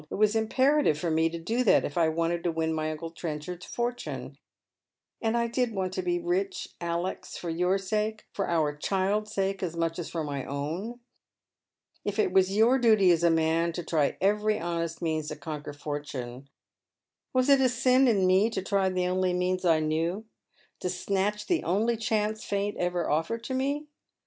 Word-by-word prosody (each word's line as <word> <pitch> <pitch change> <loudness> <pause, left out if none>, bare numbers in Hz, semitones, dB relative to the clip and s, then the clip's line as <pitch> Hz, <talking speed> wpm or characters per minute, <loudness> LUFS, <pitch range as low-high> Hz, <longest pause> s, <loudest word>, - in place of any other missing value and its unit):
It - - -4
was 210 +1 +3
imperative 260 - +3
for 165 +1 -2
me 160 +1 +3
to 170 - -5
do 225 +10 -1
tliat 220 - +5
if - - -4
I 165 -2 +3
wanted 170 +1 -1
to 170 - +2
win 160 0 -1
my 155 0 -1
uncle 155 +1 -5
Trenchard's 165 +2 -6
for 240 0 -1
tune 245 - -7 0.4
— - - -61
and 225 +1 +1
I 235 - +2
did 235 -1 -1
want 185 -1 -2
to 185 - -1
be 175 -1 0
rich, 175 +3 -2
Alex, 170 +2 -3
for 170 - -4
your 180 +3 +1
sake, 215 +2 -2
for 195 - -2
our 155 -3 +1
child's 200 +6 0
sake, 195 -1 -1
as 170 -3 -3
much 165 0 -1
as 175 - -4
for 165 -2 -3
my 140 -3 -3
own. 165 - -4 1.0
if - - -3
it 415 -3 +2
was 190 +1 +3
your 240 +5 +5
duty 215 -6 +5
as 170 0 +2
a 170 - +5
inan 165 +1 +1
to 175 - -3
try 155 -3 0
every 210 +2 +2
honest 170 0 -3
means 155 -2 -1
to 150 - -4
conquer 150 0 -6
foilune, 140 -3 -6 0.8
was 255 0 +2
it 275 -1 +6
a 260 - +4
sin 255 +2 +4
in 200 -6 +3
me 190 +4 +4
to 190 -5 -3
try 195 -1 +1
tlie 180 -1 0
only 185 0 +1
means 180 +1 0
I 160 -2 +4
knew, 165 +7 -1 0.5
to 180 - -2
snatch 200 +3 -1
the 350 -2 0
only 215 +7 +1
chance 215 -1 -1
Fate 200 +1 -1
ever 175 -1 0
offered 165 +10 -1
to 260 - -4
me 280 +3 -1
185 Hz, 195 wpm, -28 LUFS, 165-215 Hz, 1.0 s, it